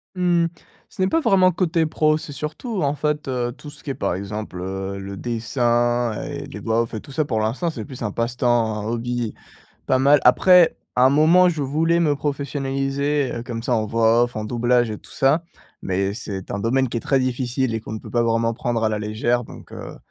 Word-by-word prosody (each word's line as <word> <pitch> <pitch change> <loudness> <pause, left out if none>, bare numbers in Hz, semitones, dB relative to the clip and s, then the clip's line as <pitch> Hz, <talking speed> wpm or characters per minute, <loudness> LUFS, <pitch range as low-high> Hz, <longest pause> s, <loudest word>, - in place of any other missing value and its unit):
Mmh, 175 -2 +2 0.4
ce - - -7
n'est 185 - +3
pas 325 +12 +1
vraiment 185 -8 +4
côté 165 -2 +1
pro, 155 0 +2
c'est 150 -2 -8
surtout 160 - -4
en 140 +1 +1
fait, 150 -1 -2
heu, 120 -2 -1
tout 150 - -11
ce 145 0 -13
qui 140 - -4
est - - -2
par - - -2
exemple, 100 0 -5
heu, 95 +1 -4
le 100 0 -6
dessin 120 0 0
et - - -6
les - - -8
voix 115 +1 +1
off 115 - -4
et 110 - -3
tout 140 - -12
ça 155 - +1
pour 110 -7 -1
l'instant 115 +11 -1
c'est 160 - -6
plus 130 -4 -10
un 105 -3 -2
passe-temps, 115 -2 0
un 105 - -5
hobby 120 0 -2 0.5
pas 130 - +3
mal. 140 +2 +5
Après, 175 +7 +6 0.2
à 125 +1 +5
un - - +5
moment 165 +6 +5
je 160 -4 -2
voulais 160 +5 +1
me 155 -4 +2
professionnaliser, 140 0 -1
heu, 115 - -4
comme 120 -2 -6
ça 125 - 0
en 110 -1 +1
voix 115 +2 +3
off, 120 -1 -2
en 110 - -3
doublage 120 +1 +1
et 105 - -6
tout - - -19
ça, 140 +5 +2 0.4
mais 95 +1 -1
c'est 100 -4 -6
un 100 - -3
domaine 130 +4 +1
qui 115 - -2
est - - -6
très 135 +2 +1
difficile 130 -1 -1
et 110 - -2
qu'on - - -8
ne 110 - -4
peut - - -11
pas 120 - +2
vraiment 115 0 +1
prendre 115 -1 -1
à - - +3
la 105 -1 -2
légère 110 +3 0
donc - - -13
heu, - - -8
125 Hz, 230 wpm, -22 LUFS, 115-145 Hz, 0.5 s, Après